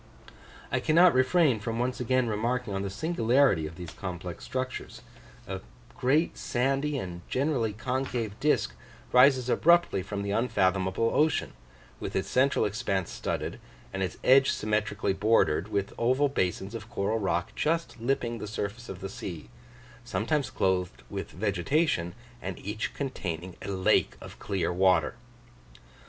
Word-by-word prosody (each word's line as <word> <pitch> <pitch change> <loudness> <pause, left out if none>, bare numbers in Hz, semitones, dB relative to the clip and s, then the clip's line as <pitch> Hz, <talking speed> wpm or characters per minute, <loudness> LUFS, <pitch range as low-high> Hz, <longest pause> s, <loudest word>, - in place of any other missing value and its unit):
I - - +2
cannot 170 +3 +5
refrain 130 0 +3
from 115 +2 -3
once 125 +1 -1
again 130 0 +1
remarking 115 +1 -1
on 95 - -1
the 100 - -3
singularity 120 - +2
of 80 - -10
these 90 -1 -8
complex 90 -2 -6
structures 130 0 -5 0.4
a - - -4 0.3
great 145 +6 +1
sandy 135 +4 0
and 90 -7 -5
generally 130 -5 +1
concave 125 -1 -2
disk 150 +1 +2 0.4
rises 130 0 +6
abruptly 170 - +4
from 100 +1 -4
the 100 - -2
unfathomable 95 -1 +1
ocean, 155 +1 +2 0.5
with - - -5
its 95 - 0
central 135 +2 +3
expanse 100 -3 -1
studded, - - -3 0.3
and 95 - -3
its 95 - -2
edge 135 +1 +6
symmetrically 105 -2 0
bordered 100 -5 +2
with 100 -2 -2
oval 130 +5 +3
basins 95 -3 -1
of 115 -1 -7
coral 105 +1 -1
rock 90 -3 -1
just 165 -5 -1
lipping 120 -2 -1
the - - -5
surface 105 +3 -5
of 95 -1 -7
the 95 - -3
sea, 85 -5 -7 0.5
sometimes 140 +2 -1
clothed 90 -1 -1
with - - -4
vegetation, 100 - 0 0.3
and 95 -1 -5
each 105 +2 -3
containing 90 - -4
a - - -7
lake 95 -1 +2
of - - -11
clear 95 -3 -1
water! 95 +1 +3
110 Hz, 145 wpm, -28 LUFS, 95-130 Hz, 0.5 s, rises